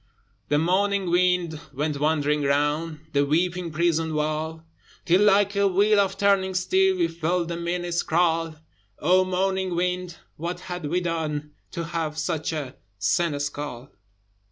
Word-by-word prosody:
The 145 - +3
moaning 190 +3 +1
wind 175 -3 +2
went 145 +1 -2
wandering 150 -1 +1
round 150 +3 0
The 140 0 +3
weeping 175 +4 0
prison 160 0 0
wall: 155 +1 -2 0.4
Till 180 +3 +4
like 205 0 +4
a 200 0 +3
wheel 205 +3 +3
of 195 -1 +1
turning 195 -2 +2
steel 190 +1 +2
We 170 -2 +2
felt 170 +1 -1
the 170 - -2
minutes 175 0 -2
crawl: 165 -1 +1 0.4
O 185 +4 +4
moaning 190 0 -1
wind! 180 0 -2 0.2
what 175 +3 -4
had 180 -3 -6
we 175 +4 0
done 155 -3 -3 0.2
To 170 - -3
have 165 -2 -3
such 160 0 -2
a 145 -5 -5 0.2
seneschal? 145 - -2
170 Hz, 140 wpm, -25 LUFS, 155-180 Hz, 0.4 s, Till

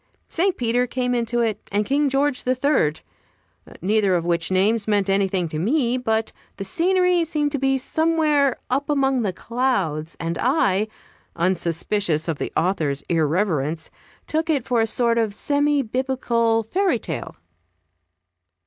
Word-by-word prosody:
St. 375 +2 0
Peter 245 +1 +1
came 250 0 -1
into 240 0 0
it, 220 -3 -1
and 205 +1 +1
King 285 +3 +1
George 275 0 0
the 255 +1 +1
Third; 250 - +1 0.8
neither 200 -1 +2
of 170 -1 -1
which 170 -1 0
names 200 +4 +2
meant 205 -2 +1
anything 195 -2 +1
to 155 - -4
me; 245 - +1
but 225 -3 -1 0.3
the 195 - -5
scenery 360 - +2
seemed 300 -2 -1
to 285 - -2
be 270 0 +2
somewhere 305 -2 +1
up 275 +3 -1
among 270 -3 +2
the 205 -4 0
clouds, 185 - -2
and 165 0 -3
I, 215 -6 +2 0.5
unsuspicious 170 -1 0
of 160 -3 -2
the - - -3
author's 155 -5 0
irreverence, 160 -2 0 0.3
took 320 +1 -1
it 285 -6 +1
for 245 -2 +1
a 225 - +1
sort 235 +1 +1
of 215 -3 -1
semi 290 +2 +1
Biblical 235 -2 0
fairy 360 - +1
tale. - - -6
230 Hz, 150 wpm, -22 LUFS, 190-275 Hz, 0.8 s, neither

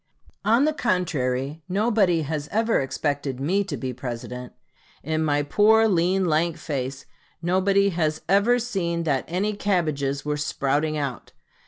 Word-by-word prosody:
On 230 +7 +4
the 310 - +1
contrary, 150 - -1
nobody 195 -4 +2
has 150 0 -3
ever 225 +2 +2
expected 140 -1 -2
me 185 +9 +1
to 155 -8 -4
be 130 +2 -4
President. 125 0 -6 0.5
In 155 +2 -1
my 145 -1 +1
poor, 220 +8 +4
lean, 185 0 +2
lank 165 +1 +1
face, 135 -4 -4 0.3
nobody 190 +3 +2
has 160 -4 -1
ever 200 +7 +4
seen 185 -8 -2
that 140 -5 0
any 195 +5 -1
cabbages 155 -9 -1
were 150 0 -1
sprouting 150 +1 0
out. 140 -4 -4
160 Hz, 140 wpm, -24 LUFS, 140-195 Hz, 0.5 s, On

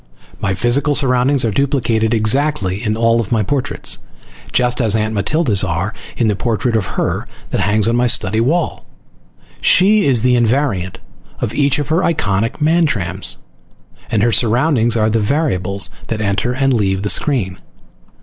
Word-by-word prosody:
My 95 0 -1
physical 125 +8 +1
surroundings 130 -1 +2
are 115 - 0
duplicated 115 -3 0
exactly 110 -3 0
in 110 -1 -1
all 115 0 +2
my 110 -2 +1
portraits, 130 +6 0 0.5
just 125 0 +1
as 110 -2 +2
Aunt 110 0 -1
Matilda's 105 - +1
are 95 +4 -2 0.2
in 115 - +1
the 105 - +1
portrait 115 +2 -1
of 105 -4 -2
her - - -2 0.2
that - - 0
hangs 105 +1 +1
on 115 - +1
my 125 0 +2
study 110 -1 +1
wall. 160 +7 -1 0.7
She 205 +2 +4
is 125 -5 +2
the 125 0 +3
invariant 115 -6 0 0.4
of 105 - -3
each 140 +1 +2
of 145 0 -3
her 165 +3 +2
iconic 115 - -1
Mantrams 110 - 0 0.7
and 105 -2 0
her 120 - +2
surroundings 120 0 +2
are 110 0 +1
the 115 - +1
variables 105 - 0 0.2
that 115 - -3
enter 100 +3 -1
and 135 +1 +1
leave 95 -4 0
the - - -1
screen. 95 - 0
115 Hz, 160 wpm, -16 LUFS, 105-135 Hz, 0.7 s, She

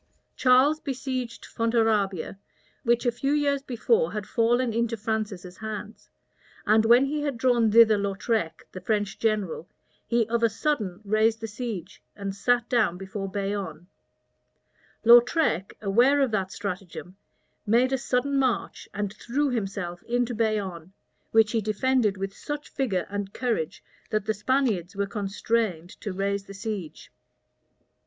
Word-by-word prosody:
Charles 265 +4 +4
besieged 255 -4 -4
Fontarabia, 220 -6 0 0.4
which 235 +1 +1
a 240 - +3
few 275 +4 -1
years 285 -2 +1
before 445 - +1
had 210 -2 -3
fallen 235 +2 +1
into 230 0 0
Francis's 210 -4 -3
hands; 220 0 -7 0.6
and 220 +1 +4
when 240 +4 +6
he 295 +2 -2
had 285 -4 -2
drawn 235 -2 +3
thither 220 -1 +6
Lautrec, 195 -4 -2
the 185 - -8
French 205 0 -1
general, 210 -7 -1 0.4
he 235 -2 +2
of 235 0 0
a 230 - +4
sudden 220 -6 -2
raised 215 +2 +2
the 225 - -4
siege, 210 -4 -6
and 200 -1 -4
sat 240 +4 +1
down 225 -9 +2
before 195 +1 -5
Bayonne. 195 -5 -4 1.2
Lautrec, 240 - +5
aware 240 +8 +4
of 270 -4 +2
that 195 -3 -1
stratagem, 185 -2 -6 0.5
made 245 +5 +3
a - - +3
sudden 270 +2 0
march, 255 -6 -1
and 205 -1 -2
threw 270 +6 -1
himself 195 -6 -3
into 245 0 0
Bayonne, 200 -6 -2 0.4
which 220 -1 +4
he 225 - +1
defended 215 0 +1
with 195 +1 -4
such 295 0 -6
vigor 205 -10 -1
and 200 0 -5
courage, 230 -11 -2 0.3
that 215 -2 -1
the 220 - +1
Spaniards 210 -6 0
were 200 0 0
constrained 200 -3 -2
to 205 - -4
raise 195 +1 -2
the 195 - -10
siege. 200 -5 -6
220 Hz, 140 wpm, -26 LUFS, 195-245 Hz, 1.2 s, when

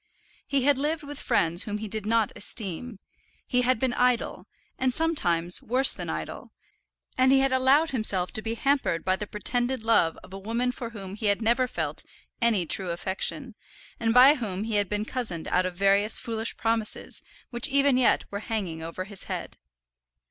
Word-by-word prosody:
He 275 -2 +1
had 280 -1 +3
lived 305 +2 -1
with 290 0 -7
friends 175 -6 +2
whom 210 -1 -3
he 215 +1 -6
did 215 0 -4
not 225 -2 +2
esteem; 210 +2 -4 0.5
he 250 -1 +1
had 250 0 +2
been 255 +1 0
idle, 250 -1 0 0.3
and 260 0 +2
sometimes 180 - 0
worse 255 +4 +3
than - - -6
idle; - - -6 0.7
and 260 +1 +5
he 270 0 +5
had 270 0 +2
allowed 270 +5 +3
himself 205 -7 +2
to 215 - -4
be 225 +1 -3
hampered 270 - 0
by 185 0 +2
the 210 +2 -6
pretended 245 +4 -2
love 225 -8 +3
of 190 - -14
a 195 - -6
woman 230 +5 -1
for 245 -2 -6
whom 195 -4 -9
he 210 +1 -2
had 200 0 +2
never 240 +3 +2
felt - - -4 0.4
any 225 -7 +2
true 185 +2 0
affection, 195 - -3 0.5
and 225 -1 +1
by 255 +4 +8
whom 210 -8 -4
he 220 -1 -1
had 205 -2 0
been 210 0 -2
cozened 220 -10 -4
out 185 +1 +2
of 180 - -7
various 200 +3 +3
foolish 225 0 -2
promises 225 -1 -2 0.3
which 240 -1 +2
even 280 0 +3
yet 255 -1 +3
were 200 - -3
hanging 195 -7 -4
over 165 +3 -5
his 200 0 -6
head. - - -5
225 Hz, 185 wpm, -26 LUFS, 195-255 Hz, 0.7 s, by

